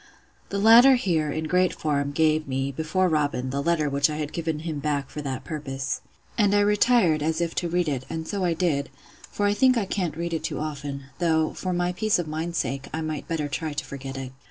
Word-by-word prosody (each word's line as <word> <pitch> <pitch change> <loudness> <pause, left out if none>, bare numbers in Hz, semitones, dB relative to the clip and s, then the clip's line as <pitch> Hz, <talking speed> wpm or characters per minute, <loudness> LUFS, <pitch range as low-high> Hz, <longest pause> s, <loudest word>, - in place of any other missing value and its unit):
The 200 - -2
latter 230 +6 +8
here, 165 -10 0
in 155 +2 -2
great 180 +3 +2
form, 140 -2 -1
gave 155 0 +2
me, 135 +1 -1
before 160 +6 0
Robin, 145 -5 0
the 140 +1 -1
letter 160 -1 +1
which 140 +1 +2
I 150 - -3
had 150 -1 -4
given 160 -2 -2
him 160 -3 -4
back 145 -1 -2
for 150 - -5
that 135 -3 -4
purpose. 135 -4 -4 0.4
And 205 -1 +4
I 205 - +5
retired, 205 -6 +3
as 160 +1 0
if 170 -1 -1
to 175 - -2
read 175 0 +1
it; 130 -3 -2
and 160 0 -4
so 200 -2 -2
I 170 -2 +1
did; 155 -5 0 0.4
for 205 - -1
I 205 - +3
think 255 +4 +4
I 215 - +1
can't 180 -5 -2
read 170 0 -3
it 160 - -2
too - - -3
often; 145 -2 -4 0.2
though, 160 -2 +2
for 185 - -3
my 175 0 0
peace 215 +4 +1
of 175 -3 -3
mind's 160 +2 -3
sake, 135 -1 -2
I 160 - -3
might 155 -2 -4
better 160 -3 -1
try 150 +2 -3
to 145 -1 -3
forget 135 -1 -7
it. 130 -1 -6
155 Hz, 230 wpm, -25 LUFS, 145-180 Hz, 0.4 s, latter